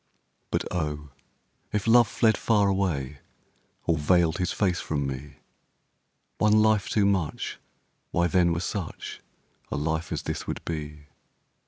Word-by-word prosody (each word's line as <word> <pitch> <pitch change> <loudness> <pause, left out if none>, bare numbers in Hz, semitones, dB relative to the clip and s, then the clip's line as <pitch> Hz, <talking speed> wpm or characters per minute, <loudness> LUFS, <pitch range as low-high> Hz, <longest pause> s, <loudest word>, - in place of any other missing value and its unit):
But - - 0
oh! 75 -4 -3 0.6
if 105 -1 -1
love 120 0 +6
fled 110 +1 +3
far 105 -3 +2
away, 80 -9 -1 0.7
Or 80 -2 +2
veiled 85 +2 +3
his 90 - 0
face 95 -4 +1
from 70 -3 -2
me, 70 +1 -6 1.0
One 105 0 +4
life 110 -2 +4
too 105 -2 +2
much, 95 -6 -1 0.5
why 85 - +1
then 85 0 +3
were 85 0 -1
such 90 -2 -5 0.5
A - - -2
life 80 +2 -2
as - - -2
this - - -4
would - - -5
be. 75 -2 -5
85 Hz, 140 wpm, -27 LUFS, 75-100 Hz, 1.0 s, love